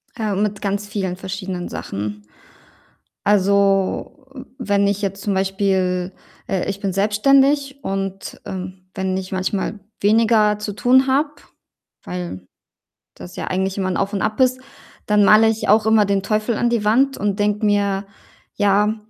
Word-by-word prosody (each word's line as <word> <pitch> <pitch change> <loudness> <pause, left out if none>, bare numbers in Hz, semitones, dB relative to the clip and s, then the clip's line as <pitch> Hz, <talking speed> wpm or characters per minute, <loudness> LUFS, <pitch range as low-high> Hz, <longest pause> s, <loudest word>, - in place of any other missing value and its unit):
Äh, 215 -4 -2
mit 205 0 -1
ganz 200 +1 -2
vielen 190 -3 -3
verschiedenen 190 -1 -5
Sachen. 105 +1 -5 1.0
Also, 200 +5 +1 0.3
wenn 200 0 +1
ich 200 +1 -1
jetzt 195 0 -3
zum 205 - -1
Beispiel 190 -1 0 0.4
äh, 190 -2 -1
ich 200 0 -3
bin 195 -2 -2
selbstständig, 275 +8 +2
und, 195 0 -4
ähm, 185 -1 -7
wenn 190 -1 -2
ich 190 0 -5
manchmal 190 +3 -2 0.2
weniger 215 0 +3
zu 210 0 -4
tun 255 +5 +4
habe, 280 +3 +2 0.7
weil 175 - -6 0.7
das 90 0 -11
ja - - -5
eigentlich 190 +1 -1
immer 190 -1 -1
'n 185 - -1
Auf 200 +1 -1
und 200 - -1
Ab 215 - -2
ist, 255 0 +3 0.5
dann 210 -1 +4
male 215 +2 +6
ich 220 0 -2
auch 215 +1 +5
immer 220 -1 +4
den 200 -1 0
Teufel 215 +2 0
an 240 +2 +1
die 235 -3 0
Wand 265 +6 +3
und 200 -1 -1
denke 210 +1 +1
mir: 200 -1 +1 0.5
„Ja, 205 +1 +2
200 Hz, 155 wpm, -20 LUFS, 190-215 Hz, 1.0 s, male